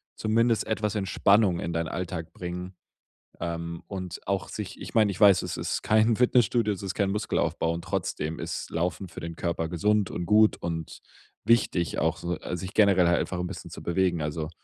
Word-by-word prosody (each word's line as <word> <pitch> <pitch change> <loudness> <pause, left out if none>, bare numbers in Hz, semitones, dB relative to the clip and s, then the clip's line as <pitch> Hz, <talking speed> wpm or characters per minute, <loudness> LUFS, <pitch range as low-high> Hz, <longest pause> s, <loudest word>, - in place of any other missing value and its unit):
zumindest 115 +1 +2
etwas 105 -1 -1
Entspannung 100 -1 +3
in 85 - -3
deinen 80 -1 -1
Alltag 85 -2 -4
bringen. 90 +1 -6 0.7
Ähm, 85 0 -4
und 90 -3 -6
auch 95 -5 -1
sich 105 -1 -6
ich - - -8
meine, 110 -3 +4
ich 95 - -8
weiß, 100 -3 +7
es - - -4
ist - - -2
kein 110 +2 +3
Fitnessstudio, 120 -3 +3
es 95 - -8
ist 95 - -3
kein 100 -2 0
Muskelaufbau 100 -5 0
und 85 0 -5
trotzdem 85 -4 -3
ist - - -4
Laufen 90 +2 -2
für - - -9
den 85 0 -6
Körper 85 -1 -2
gesund 105 +3 +1
und 90 - -3
gut 105 +2 +5
und 80 -2 -5 0.4
wichtig 100 -7 +2
auch - - +1
so 85 0 -3
al 90 - -4
sich 95 +3 -6
generell 100 -4 +5
halt 85 0 +3
einfach 90 - -3
'n 90 - -2
bisschen 95 - -8
zu - - -8
bewegen, 85 -1 +1
also, 75 +1 -3
90 Hz, 195 wpm, -27 LUFS, 85-105 Hz, 0.7 s, weiß